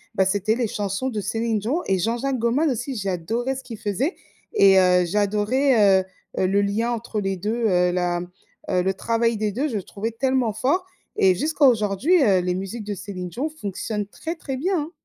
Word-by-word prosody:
bah, 190 - +3
c'était 205 +3 +1
les 240 -1 0
chansons 205 +5 -2
de 215 -4 -3
Céline 225 +2 -1
Dion 255 - -1
et 190 -1 +1
Jean-Jacques 240 +6 -1
Goldman 255 +7 +2
aussi. 250 +2 -3
J'adorais 215 +6 -2
ce 265 - -7
qu'il 230 -3 -8
faisait 210 - -1 0.4
et 195 -1 +6
heu, 180 -1 +4
j'adorais, 210 +2 +3
heu - - -7 0.4
heu, 185 - +2
le 200 +2 +2
lien 205 +4 0
entre 230 -2 -3
les 195 -1 -1
2, 225 +5 -1
heu, 180 -2 +3
la, 175 -1 0
mmh, 175 - -8 0.4
heu, 180 - +2
le 190 +2 0
travail 230 +2 0
des 210 0 -1
2 265 +9 -1
je 235 -7 -2
trouvais 205 +4 -5
tellement 255 0 +1
fort 285 - 0 0.3
et 190 -1 +4
jusqu'à 300 - +1
aujourd'hui, 245 - +3
heu, 195 -6 +4
les 180 0 -1
musiques 195 +4 -5
de 205 -1 -3
Céline 190 -2 -6
Dion 265 - -3
fonctionnent 210 -6 -4
très, 325 - -6
très 275 -5 -5
bien, 360 +6 0
hein. 300 +2 -5
215 Hz, 205 wpm, -23 LUFS, 195-255 Hz, 0.4 s, et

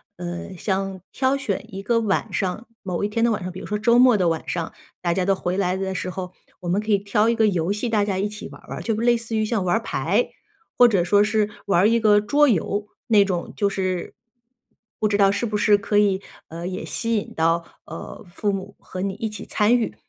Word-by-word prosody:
呃， 175 +1 -6
像 190 0 -2
挑 265 0 +1
选 250 -9 -3
一 195 - -5
个 230 +2 +2
晚 210 -4 0
上， 195 +5 -2 0.2
某 185 0 -3
一 205 - 0
天 230 +2 +1
的 - - +3
晚 195 -4 -2
上， 185 - -4
比 180 - -8
如 - - -8
说 210 - -2
周 235 +3 +4
末 250 -3 +7
的 180 -4 +2
晚 165 -1 -3
上， 170 -2 -3 0.3
大 175 -1 +1
家 180 +1 0
都 195 0 +3
回 180 0 -2
来 185 -2 +1
的 190 0 -2
时 185 0 -3
候， 180 0 -5 0.3
我 175 - -4
们 185 +3 +2
可 215 - -8
以 - - +5
挑 205 +2 +1
一 235 - +3
个 225 -1 +3
游 180 -1 0
戏 210 +4 -2
大 210 -2 +2
家 195 -2 -1
一 200 +2 0
起 210 +1 -8
玩 - - -13
儿 - - -20
玩 - - -5
儿， - - -6
就 225 - -1
类 235 +2 +3
似 230 0 -4
于 215 - +2
像 215 -2 0
玩 175 - +2
儿 225 - +1
牌。 - - 0 0.5
或 245 - +7
者 195 -6 +2
说 205 +3 +4
是 210 0 +1 0.2
玩 180 -3 +4
儿 205 - +5
一 230 +1 +3
个 210 -2 +5
桌 285 +8 +3
游， 205 +1 0 0.2
那 215 -3 +6
种 180 -3 -3
就 200 - +1
是 185 -2 -3 0.8
不 215 - +2
知 205 -1 +1
道 195 -1 +5
是 200 +4 -1
不 215 -2 -3
是 210 0 +4
可 205 +1 +1
以， 200 -2 +3 0.3
呃， 170 +2 -6
也 185 0 -4
吸 230 -1 -1
引 205 - -2
到， 165 +1 +2 0.2
呃， 165 +5 -9
父 205 - 0
母 195 0 -5
和 185 - -7
你 195 0 -1
一 220 +2 -3
起 210 -1 -8
参 220 +3 +3
与。 230 - -2
205 Hz, 270 characters per minute, -23 LUFS, 185-220 Hz, 0.8 s, 末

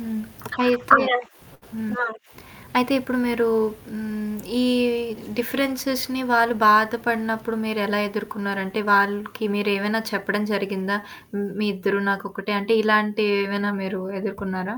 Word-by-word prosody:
హ్మ్. 225 -1 -5 0.4
అయితే 245 0 +3 0.8
హ్మ్. 225 +2 -3 0.7
అయితే. 250 +2 +3
ఇప్పుడు 255 0 -3
మీరు 235 -1 +1 0.5
హ్మ్. 215 -1 -5 0.3
ఈ - - +3 0.8
డిఫరెన్సెస్‌‌ని 260 0 -1
వాళ్ళు 230 0 +4
బాధపడినప్పుడు 225 +1 +3
మీరెలా 210 -1 0
ఎదుర్కున్నారంటే, 200 -1 -4
వాళ్ళకి 205 +2 +2
మీరేవైనా 205 +1 0
చెప్పడం 200 +1 -1
జరిగిందా? 200 0 -1 0.4
హ్మ్, 200 -1 -3
మీ 210 - +1
ఇద్దరు 195 +1 0
నాకొక్కటే, 195 +1 -4
అంటే 225 +3 +2
ఇలాంటివేమైనా 205 -1 +2
మీరు 190 0 -4 0.2
ఎదుర్కున్నారా? 200 0 -5
210 Hz, 100 wpm, -23 LUFS, 200-230 Hz, 0.8 s, వాళ్ళు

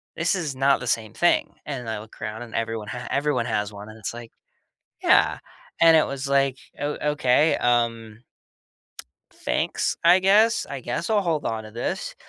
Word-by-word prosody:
this 170 +1 +1
is 155 -7 -3
not 135 +1 +3
the 125 - -6
same 110 -2 -1
thing." 175 - +1
And 130 -5 -5
I 110 -2 -3
look 110 +1 -13
around 105 +1 -5
and 115 - -10
everyone 115 -2 -3
ha 120 +2 -6
everyone 145 -3 0
has 105 -2 -2
one. 105 +1 -10
And 110 - -12
it's 110 - -5
like 120 -1 -10 0.7
yeah. - - +4 0.4
And 165 -1 +7
it 155 - +4
was 140 0 -4
like, 135 -1 +2 0.2
"Oh, 145 0 -3
okay, 150 +2 +3
um" 115 -2 0 1.1
"thanks, - - -1
I 175 +2 +7
guess. 210 +4 +4
I 140 - -5
guess 125 - -3
I'll 210 -2 +3
hold 160 -5 -1
on 110 -1 -3
to 110 - -10
this." 115 +3 -4
125 Hz, 180 wpm, -24 LUFS, 115-150 Hz, 1.1 s, And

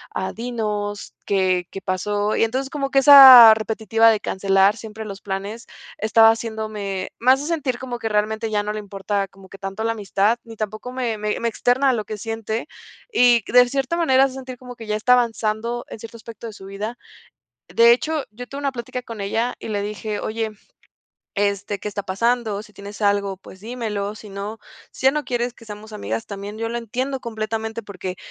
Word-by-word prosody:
ah, 190 - -2
dinos 210 -3 -4
qué 185 -3 +1
qué 195 - -7
pasó". 205 +3 -1
Y - - +4
entonces 260 +4 -3
como 275 -1 -3
que 275 - +5
esa 265 -5 +11
repetitiva 220 +1 +2
de 215 -2 +2
cancelar 195 +2 +2
siempre 220 0 -8
los 200 -1 -7
planes 200 +4 -5 0.3
estaba 225 +1 +5
haciéndome, 215 -4 -4
más 260 +3 +4
de 290 - -5
sentir 290 -7 -2
como 245 -2 -5
que 225 - -3
realmente 215 +1 0
ya 210 -1 0
no 210 - -3
le 215 - -4
importa 200 0 -3
como 195 0 -17
que 195 - -11
tanto 195 +2 -5
la 230 - +1
amistad, 210 +1 0
ni 225 -1 -10
tampoco 215 +3 -5
me 240 -4 -2
me 210 0 -2
me 235 - +1
externa 255 +4 +2
a 260 - +3
lo 215 -3 -2
que 215 0 -6
siente, 225 +3 -4 0.4
y, 245 - +5
de 250 0 +7
cierta 275 +5 -1
manera, 270 -6 +4
hace 270 -1 0
sentir 260 -1 -8
como 250 0 -10
que 225 -2 -10
ya 210 - 0
está 225 +4 +3
avanzando 235 -1 0
en - - -8
cierto 230 +1 -10
aspecto 230 0 -10
de 220 - -8
su 195 - -12
vida. 210 +5 -5 0.7
De 235 0 +6
hecho, 305 +4 0
yo 245 +4 -9
tuve 275 - -8
una 280 -1 -1
plática 250 +1 -5
con 230 -3 -8
ella 225 +5 -1
y - - -7
le 205 -2 -2
dije: 210 0 -4
"Oye, 220 0 -3 0.8
este, 200 0 -1
¿qué 210 - -5
está 205 0 -4
pasando? 220 +1 0
Si 210 -1 -18
tienes 200 +1 -10
algo, 200 -2 +1
pues, 190 0 -14
dímelo. 215 -3 -4
Si 215 0 -12
no, 200 +3 -6 0.3
si - - -2
ya 270 - +6
no 300 -1 -2
quieres 245 0 -2
que 230 - -16
seamos 215 0 -10
amigas, 115 - -4
también, 200 +1 -7
yo 230 0 -2
lo 235 - -4
entiendo 255 +4 -3
completamente 225 0 -4
porque, 185 -2 -6
220 Hz, 205 wpm, -22 LUFS, 205-240 Hz, 0.8 s, esa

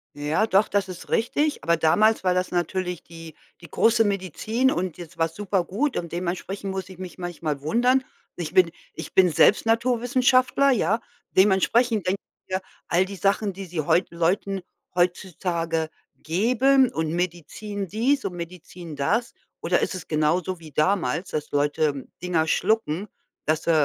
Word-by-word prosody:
Ja, 150 +9 +1
doch, 200 0 +3
das 200 -1 0
ist 180 -1 -9
richtig. 290 +6 0
Aber 170 +1 +2
damals 215 +8 +3
war 180 - +4
das 180 0 -1
natürlich 180 0 -2
die 165 -1 -11 0.3
die 170 - -12
große 225 0 +4
Medizin 205 - 0
und 180 -6 -2
jetzt 170 -1 -11
war's 165 0 0
supergut 205 +7 -1
und 170 -1 -3
dementsprechend 185 +3 -4
muss 190 -1 -5
ich 185 - -11
mich 185 -1 -8
manchmal 165 -5 -4
wundern. 245 - +2 0.3
Ich 170 -3 -5
bin 180 -3 +5 0.2
ich - - -8
bin 185 -1 +6
selbst 175 +7 +4
Naturwissenschaftler, 250 +3 +3
ja? 220 -2 +2 0.3
Dementsprechend 200 +3 +3
denke 195 +2 0 0.3
ich 185 - -8
mir, 190 - -1 0.3
all 180 +2 +3
die 200 +1 -8
Sachen, 200 +2 +1
die 195 +2 -7
sie 175 -2 -5
heute 170 +4 +1
Leuten 185 +3 0 0.3
heutzutage 170 -2 -1 0.3
geben 250 +9 +3
und 160 0 -2
Medizin 180 +4 -4
dies 250 +9 +1
und 185 - -2
Medizin 170 -2 -8
das 225 - 0 0.3
oder - - +2
ist - - -1
es 180 - -8
genauso 165 +4 0
wie 160 -2 -12
damals, 170 0 +1
dass 150 -1 -4
Leute 145 -1 0 0.2
Dinger 170 -3 0
schlucken, 200 0 0 0.4
das, 155 0 0
äh 170 - +3
185 Hz, 160 wpm, -24 LUFS, 165-215 Hz, 0.4 s, bin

